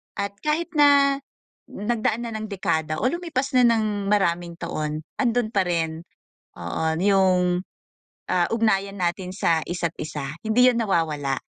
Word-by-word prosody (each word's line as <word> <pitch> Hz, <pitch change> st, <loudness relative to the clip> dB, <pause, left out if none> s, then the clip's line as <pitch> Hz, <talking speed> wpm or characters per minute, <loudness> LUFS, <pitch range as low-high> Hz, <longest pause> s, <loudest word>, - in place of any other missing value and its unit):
at 200 Hz, 0 st, -2 dB
kahit 310 Hz, -, -1 dB
na 280 Hz, -1 st, +5 dB, 0.5 s
nagdaan 220 Hz, +2 st, -1 dB
na 230 Hz, -, -5 dB
ng 215 Hz, 0 st, -5 dB
dekada 160 Hz, -6 st, -1 dB
o 255 Hz, -, +3 dB
lumipas 330 Hz, -6 st, -2 dB
na 245 Hz, -1 st, +6 dB
ng 215 Hz, -3 st, 0 dB
maraming 175 Hz, -4 st, +1 dB
taon, 155 Hz, -3 st, -4 dB, 0.2 s
andun 240 Hz, -3 st, +1 dB
pa 195 Hz, -4 st, +1 dB
rin 165 Hz, -2 st, -1 dB, 0.6 s
oo 85 Hz, -, -3 dB, 0.2 s
yung, 185 Hz, -2 st, +3 dB, 0.7 s
ah, 180 Hz, -2 st, +2 dB
ugnayan 200 Hz, -3 st, +1 dB
natin 180 Hz, 0 st, -2 dB
sa 165 Hz, -4 st, +2 dB
isa't 170 Hz, -1 st, -3 dB
isa, 150 Hz, -2 st, -5 dB, 0.2 s
hindi 250 Hz, +3 st, +5 dB
yan 235 Hz, -, -1 dB
nawawala. 155 Hz, -10 st, 0 dB
195 Hz, 140 wpm, -24 LUFS, 170-230 Hz, 0.7 s, na